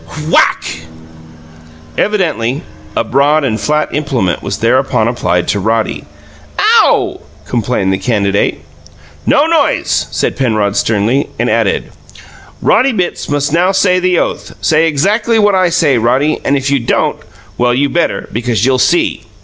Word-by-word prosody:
Whack! - - +3 1.3
Evidently 160 - -1 0.3
a - - +2
broad 140 +6 +2
and 115 -5 -1
flat 150 0 -1
implement 130 - -1
was 100 - -4
thereupon 125 -1 +1
applied 90 -7 -1
to 100 - 0
Roddy. 110 +2 -1 0.5
"OW!" - - +3 0.3
complained 115 -5 -1
the 95 - -2
candidate. 100 -1 0 0.7
"No 290 +1 +4
noise!" 325 -3 +1
said - - -2
Penrod 110 -6 0
sternly, 110 +6 0
and - - 0
added: - - 0 0.7
"Roddy 265 0 +3
Bitts 180 -5 -3
must 145 +1 -1
now 180 +3 +3
say 185 -1 +2
the 180 -1 +1
oath. - - -3
Say 160 +1 +2
exackly 210 +10 +1
what 205 -2 +3
I 185 -2 +2
say, 155 -7 +2
Roddy, 130 +7 +1
and 140 - +1
if 135 0 -2
you 140 - +2
don't 120 - 0 0.4
well, 120 0 +2
you 140 +3 +1
better, 170 +4 -1
because 115 -2 -1
you'll 130 -1 +2
see! 175 +6 +1
135 Hz, 140 wpm, -13 LUFS, 115-175 Hz, 1.3 s, No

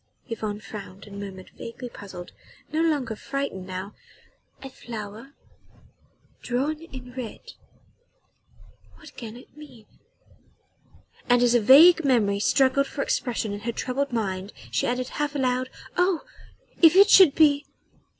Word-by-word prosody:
Yvonne 215 -3 -4
frowned 200 -3 -10
and 200 -1 -10
murmured, 190 -2 -9
vaguely 230 +2 -7
puzzled 195 -6 -10 0.4
no 315 - +1
longer 290 -9 0
frightened 270 -7 -5
now: 185 +2 -6 0.7
"A 270 - -7
flower... 225 +2 -9 1.1
drawn 275 +5 -2
in 260 -6 -11
red... 250 -4 -8 1.4
what - - -15
can 230 -1 -8
it 250 - -17
mean?" 265 -8 -14 1.4
And 245 0 +5
as 240 -1 +4
a 240 - +5
vague 320 +9 +8
memory 220 -7 +2
struggled 270 +4 +3
for 275 - -3
expression 230 -5 -2
in 205 - -5
her 235 +3 -3
troubled 260 +4 -2
mind 195 -4 -3 0.2
she - - 0
added 250 +1 -1
half 295 0 -3
aloud: 255 -1 0 0.3
"Oh! 360 -2 +2 0.6
if 330 0 +7
it 400 +2 +7
should 365 -8 +8
be 290 -2 +4
250 Hz, 130 wpm, -25 LUFS, 210-280 Hz, 1.4 s, vague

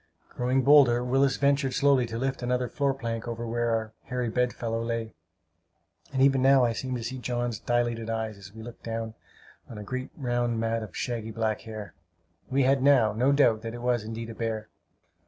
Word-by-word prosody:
Growing 130 +2 +1
bolder, 130 -4 +6
Willis 135 +2 +2
ventured 140 -1 +2
slowly 140 -3 +3
to 115 0 -5
lift 135 +2 -2
another 125 0 0
floor 140 +2 0
plank 115 -4 -4
over 120 0 -4
where 120 +1 -1
our 110 -1 -1
hairy 125 -2 -2
bed 125 +2 +1
fellow 115 -1 -3
lay; 115 -1 -3 1.0
and 135 -1 +2
even 135 -1 +4
now 135 -1 +6
I 115 - +1
seem 130 +2 -3
to 120 - -4
see 130 +3 -4
John's 120 -2 -2
dilated 120 -2 -1
eyes, 110 -1 -2
as 100 0 -12
we 110 +1 -10
looked 120 +1 -10
down 115 -1 -4 0.6
on 115 - -8
a 105 - -6
great 130 +5 -4
round 120 -4 -1
mat 115 0 0
of 110 -4 -8
shaggy 115 -3 -3
black 110 -1 -1
hair! 110 -4 -8 0.6
We 135 +1 +2
had 135 +1 +3
now 130 -6 +5
no 125 +6 +2
doubt 120 -6 +4
that 115 +1 -6
it 120 - -8
was, 120 -3 +1
indeed, 115 +1 -6
a - - -7
bear. 110 -1 -3
120 Hz, 200 wpm, -27 LUFS, 115-130 Hz, 1.0 s, bolder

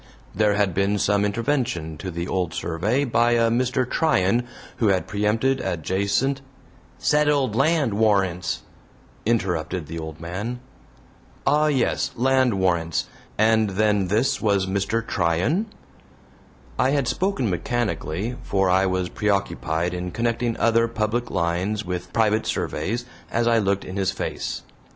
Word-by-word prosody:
There 105 0 +2
had 100 -3 +1
been 100 +3 +1
some 100 +1 +2
intervention 115 - -1
to 95 - -5
the 85 0 -4
old 90 -4 -1
survey 110 - 0
by 120 -1 +3
a 115 -1 +3
Mr. 125 +1 +1
Tryan 120 - +2 0.3
who 115 - +2
had 95 -2 +2
preempted 110 +6 +1
adjacent 100 - 0 0.6
"settled 145 -6 +2
land 140 -3 +2
warrants," 95 -4 +1 0.6
interrupted 90 -7 0
the 85 +3 -6
old 80 -1 -7
man. 100 +9 -4 0.9
"Ah, 150 +1 +3
yes! 135 -5 +1
Land 130 -2 +3
warrants 85 -4 0 0.3
and 110 0 +3
then 105 0 +1
this 110 +8 +1
was 100 -3 +2
Mr. 100 +4 -1
Tryan?" 90 - +1 1.1
I 130 - +4
had 140 -2 +1
spoken 185 - 0
mechanically, 100 +1 -2
for 95 -2 +1
I 95 +1 +3
was 95 -1 0
preoccupied 90 -5 -1
in 90 0 -3
connecting 115 +2 -1
other 115 0 +3
public 115 +1 -1
lines 95 +4 -1
with 90 0 -4
private 110 -1 +2
surveys 115 +11 -2 0.2
as 115 0 0
I 115 -1 +4
looked 100 -1 0
in 95 - -6
his 95 -1 +1
face. - - -4
105 Hz, 135 wpm, -23 LUFS, 95-120 Hz, 1.1 s, I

